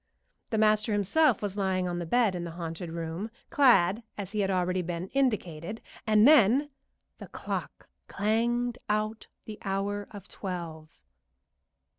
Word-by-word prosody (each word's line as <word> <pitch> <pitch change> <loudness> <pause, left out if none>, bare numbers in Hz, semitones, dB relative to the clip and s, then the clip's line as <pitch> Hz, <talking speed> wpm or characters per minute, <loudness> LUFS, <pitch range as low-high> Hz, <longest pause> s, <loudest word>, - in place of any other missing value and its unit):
The 220 - -1
master 215 0 +3
himself 215 - +2
was 200 -2 -2
lying 190 -2 0
on 175 0 -3
the 170 - -5
bed 230 +1 +3
in 175 -1 -4
the 170 - -5
haunted 165 0 -5
room, 165 +5 -4 0.2
clad 240 - +4 0.2
as 200 -2 -6
has 205 -2 0
already 185 -1 0
been 175 +1 -4
indicated, 215 - -1 0.3
and 215 +2 +6
then 285 0 +5 0.5
The - - -9
clock - - -6 0.2
clanged 235 +4 0
out 215 +1 -1 0.2
the 215 -1 -8
hour 200 +1 -2
of 205 -2 -11
twelve. 165 - -7
205 Hz, 140 wpm, -28 LUFS, 180-220 Hz, 0.5 s, and